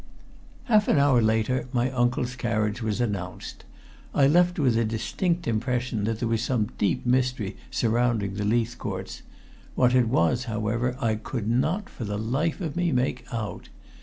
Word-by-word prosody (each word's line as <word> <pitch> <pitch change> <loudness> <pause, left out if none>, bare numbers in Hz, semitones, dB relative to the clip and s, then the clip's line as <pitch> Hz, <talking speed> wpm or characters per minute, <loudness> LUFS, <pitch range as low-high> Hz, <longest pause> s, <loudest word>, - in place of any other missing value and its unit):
Half 215 -5 +3
an - - +3
hour 140 -4 +4
later 110 +4 +1
my 125 +1 +1
uncle's 125 0 0
carriage 110 -3 -1
was 110 -1 -1
announced, 100 -7 -4 0.5
and - - +1
I - - +7
left 175 +4 +3
with 135 -6 +3
the 115 +1 +2
distinct 165 - -1
impression 115 -1 -1
that 115 0 -1
there 120 - -2
was 115 -1 0
some 115 -4 0
deep 100 - 0
mystery 125 -5 0
surrounding 115 -3 +1
the 105 +1 -3
Leithcourts. 115 +2 -2 0.5
What 125 -1 +3
it 125 -2 +4
was, 110 +5 +2
however, 115 +2 -1
I 115 -4 +1
could 110 0 -4
not, 155 - 0
for - - -8
the 105 -1 -3
life 135 - -1
of 160 -5 -3
me, 175 -1 +1
make 125 -1 -1
out. 110 -6 -5
120 Hz, 165 wpm, -26 LUFS, 110-130 Hz, 0.5 s, I